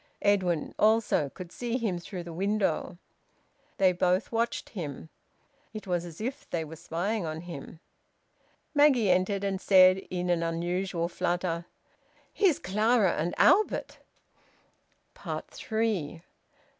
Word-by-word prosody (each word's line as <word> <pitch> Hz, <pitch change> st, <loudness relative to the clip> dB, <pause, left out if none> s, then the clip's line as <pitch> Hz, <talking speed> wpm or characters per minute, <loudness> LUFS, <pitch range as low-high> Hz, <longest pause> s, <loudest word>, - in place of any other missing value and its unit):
Edwin 185 Hz, -6 st, +1 dB
also 215 Hz, -9 st, +3 dB
could 180 Hz, +4 st, -10 dB
see 245 Hz, 0 st, -2 dB
him 210 Hz, -8 st, -1 dB
through 180 Hz, +1 st, -7 dB
the 170 Hz, -1 st, -8 dB
window. 190 Hz, -2 st, -1 dB, 0.8 s
They 190 Hz, -2 st, +5 dB
both 180 Hz, +2 st, +1 dB
watched 230 Hz, +1 st, -1 dB
him; 160 Hz, -, -6 dB, 0.7 s
it 215 Hz, -, -6 dB
was 175 Hz, -2 st, -1 dB
as 170 Hz, -2 st, -10 dB
if 255 Hz, +5 st, -5 dB
they 165 Hz, -2 st, -2 dB
were 160 Hz, +1 st, -9 dB
spying 175 Hz, +6 st, -2 dB
on 155 Hz, +1 st, -4 dB
him. 165 Hz, -2 st, -9 dB, 0.9 s
Maggie 275 Hz, -9 st, +5 dB
entered, 185 Hz, +2 st, +1 dB
and 195 Hz, -1 st, -2 dB
said, 185 Hz, -1 st, +6 dB
in 180 Hz, -1 st, -1 dB
an 170 Hz, -1 st, +1 dB
unusual 170 Hz, +1 st, -1 dB
flutter 175 Hz, -1 st, -2 dB, 0.7 s
"Here's 370 Hz, -8 st, +3 dB
Clara 210 Hz, 0 st, +2 dB
and 165 Hz, +3 st, -2 dB
Albert!" 425 Hz, +2 st, +3 dB, 1.1 s
THREE. 210 Hz, -8 st, -3 dB
185 Hz, 120 wpm, -28 LUFS, 170-215 Hz, 1.1 s, said